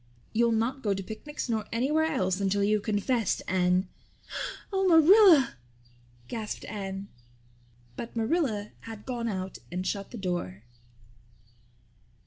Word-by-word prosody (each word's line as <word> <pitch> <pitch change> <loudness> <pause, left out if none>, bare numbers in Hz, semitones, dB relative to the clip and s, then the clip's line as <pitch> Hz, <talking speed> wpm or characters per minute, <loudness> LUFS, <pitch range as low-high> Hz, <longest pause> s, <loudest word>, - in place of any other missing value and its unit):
"You'll 235 +1 +3
not 230 +5 0
go 205 -4 +1
to 195 - -4
picnics 245 +10 -6
nor 220 -3 -1
anywhere 285 +7 +2
else 195 - 0
until 200 +1 +1
you've 210 +1 +2
confessed, 215 +1 0
Anne." 185 0 +2 0.9
"Oh, 385 0 +2
Marilla," 335 - +7 0.7
gasped 215 - -5
Anne. 195 -1 -5 0.9
But 230 - -7
Marilla 225 -4 0
had 220 -2 -10
gone 240 -3 -3
out 190 -3 -4
and 180 +1 -3
shut 200 0 -2
the 245 - -8
door. 175 - -3
220 Hz, 120 wpm, -28 LUFS, 195-260 Hz, 0.9 s, Marilla